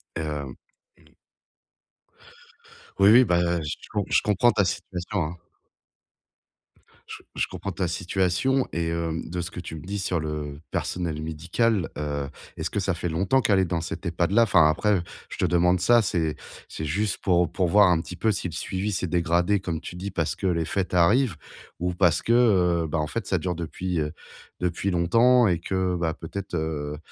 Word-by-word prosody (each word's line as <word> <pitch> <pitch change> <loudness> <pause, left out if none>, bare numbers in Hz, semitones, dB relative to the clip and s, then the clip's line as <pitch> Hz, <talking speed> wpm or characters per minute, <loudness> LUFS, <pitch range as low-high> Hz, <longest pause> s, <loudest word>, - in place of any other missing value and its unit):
Hem, 75 -5 -4 0.4
mmh. - - -25 1.8
Oui, 100 - +7
oui, 120 +4 +8
bah, 85 -2 +1
je 75 - -3 0.2
com 105 -1 0
je - - +3
comprends 105 +4 +3
ta 100 - +2
situation, 90 +1 -3
hein. 80 +3 -5 1.7
Je - - -7 0.2
je - - 0
comprends 100 - -6
ta 90 0 -1
situation 95 +9 +1
et 85 0 -1
heu, 85 -1 -2
de 90 +1 -4
ce 90 - -5
que - - -7
tu 80 -2 -7
me 75 - -8
dis 100 +5 -4
sur 90 -3 0
le 75 -1 -5
personnel 85 -4 -2
médical. 85 +6 0
Heu, 70 -2 -3 0.3
est-ce 80 - -3
que 105 - -2
ça 95 0 0
fait 85 +1 -3
longtemps 95 +11 +2
qu'elle 105 -4 +3
est 95 - +3
dans 85 -1 -2
cet 85 +3 -6
EHPAD 85 +1 0
là? 115 +3 +5
Enfin 80 -8 +5
après, 100 +4 +1 0.3
je - - -8
te - - +1
demande 90 +1 +3
ça, 120 +5 +5
c'est 85 -6 -1 0.3
c'est 80 - -5
juste 100 +7 0
pour 90 -3 +1
pour 90 0 0
voir 100 +2 +6
un 85 - +3
petit 85 +2 -7
peu 110 +5 +1
si 95 - -2
le 85 - -8
suivi 95 +5 -3
s'est 90 0 -1
dégradé 85 +3 +1
comme 85 -4 -4
tu 85 - -8
dis, 100 +1 -5
parce 80 -4 -1
que 95 - -2
les 85 -2 +1
fêtes 95 +3 -2
arrivent 100 - +3 0.4
ou 90 +1 -1
parce 85 -2 +3
que, - - -1 0.5
heu, - - -3
ben, 80 +1 -1
en 75 - -1
fait 70 - -4
ça - - +1
dure 90 -2 -2
depuis 85 +1 -3 0.6
depuis 90 +2 -1
longtemps 115 +8 +4
et 85 -3 +1
que 90 0 -1 0.2
peut-être, 90 +3 -6
heu, 75 -2 -3
90 Hz, 190 wpm, -25 LUFS, 80-100 Hz, 1.8 s, oui